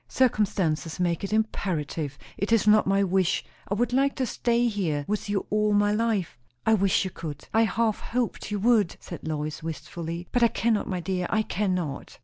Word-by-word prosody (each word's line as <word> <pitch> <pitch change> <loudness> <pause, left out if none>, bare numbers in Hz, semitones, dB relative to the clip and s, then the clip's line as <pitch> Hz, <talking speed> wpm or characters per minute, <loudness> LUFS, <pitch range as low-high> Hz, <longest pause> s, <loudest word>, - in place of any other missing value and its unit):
Circumstances 190 -10 +1
make 175 0 0
it 195 - -3
imperative. 165 -9 -1 0.2
It 200 +3 -2
is 230 -3 +4
not 215 -1 +5
my 195 +1 +3
wish. 190 -2 +1 0.2
I 200 - -1
would 240 +3 0
like 275 +2 +2
to 260 - 0
stay 240 0 +1
here 170 -10 -1
with 210 0 -2
you 205 -1 0
all 210 0 +2
my 205 0 +3
life." 210 - 0 0.3
"I 220 - +4
wish 195 -3 +3
you 190 - -4
could. 150 -4 -7
I 225 +1 +5
half 220 +1 0
hoped 240 -3 -2
you 210 - -1
would," 220 -5 +3
said 170 - -8
Lois 155 0 -3
wistfully. 165 +2 -5
"But 245 - +1
I 235 - +7
cannot, 225 -2 0
my 180 -2 -2
dear. 180 0 -2
I 220 0 +2
cannot." 180 -9 -2
200 Hz, 190 wpm, -26 LUFS, 170-220 Hz, 0.3 s, I